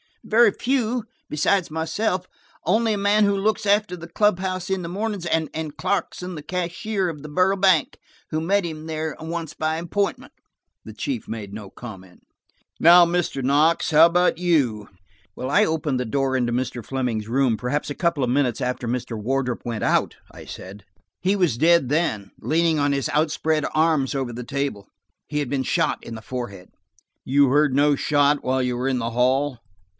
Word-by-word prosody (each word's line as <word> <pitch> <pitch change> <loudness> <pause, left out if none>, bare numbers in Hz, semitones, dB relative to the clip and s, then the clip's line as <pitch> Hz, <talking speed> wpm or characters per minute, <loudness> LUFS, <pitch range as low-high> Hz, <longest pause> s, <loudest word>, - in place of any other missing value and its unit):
"Very 225 0 +5
few–besides 220 - -1
myself, 180 +4 -1 0.4
only 220 +5 +2
a - - -1
man 205 +1 +3
who 200 -1 +3
looks 215 +2 0
after 205 -2 +2
the 170 0 -9
club 210 +2 +2
house 185 -1 -3
in 190 -1 -1
the 170 - -5
mornings, 200 0 -3
and 160 -2 -2
Clarkson, 185 -2 -2
the 150 - -6
cashier 185 +3 -2
of 150 -3 -7
the 150 - -9
Borough 185 +5 +2
Bank, 185 -6 +2 0.3
who 155 - -1
met 195 +5 +1
him 160 -2 -6
there 160 -1 -3
once 165 -1 -5
by 155 0 -1
appointment." 185 +4 -2 0.5
The - - -9
chief 265 -5 -4
made 105 -3 -6
no 105 -2 -8
comment. 95 -6 -11 0.6
"Now, 175 +2 +8
Mr. 170 -6 -1
Knox, 150 +7 +2
what 155 +1 +8
about 175 +1 +2
you?" 140 - +1 0.5
"I 140 +12 +3
opened 150 -6 -1
the 125 - -1
door 135 +3 0
into 120 -2 0
Mr. 120 -1 -3
Fleming's 125 -5 -2
room, 125 -1 +1
perhaps 130 +7 -2
a 145 - -4
couple 170 -6 0
of 125 - 0
minutes 125 -2 +1
after 125 -1 -2
Mr. 120 -1 -3
Wardrop 125 +2 -2
went 115 -3 -3
out," - - +1 0.2
I - - -12
said. 100 +2 -10 0.4
"He 190 +3 +1
was 175 - +1
dead 165 -2 +4
then, 110 - -1
leaning 165 0 +1
on 145 0 +2
his 140 -1 -1
outspread 155 0 +1
arms 155 -4 +2
over 130 -3 -2
the 125 +2 -6
table; 135 -6 -3 0.4
he 150 0 -2
had 145 -4 -2
been 135 -2 -1
shot - - 0
in 115 - -8
the 110 - -8
forehead." 110 -5 -6 0.5
"You 140 +1 +3
heard 145 0 +3
no 145 +1 +4
shot 145 0 +2
while 130 +1 +1
you 125 -1 -1
were 125 +2 -1
in 130 -2 0
the 115 0 -2
hall 130 +2 +1
150 Hz, 180 wpm, -23 LUFS, 125-180 Hz, 0.6 s, Now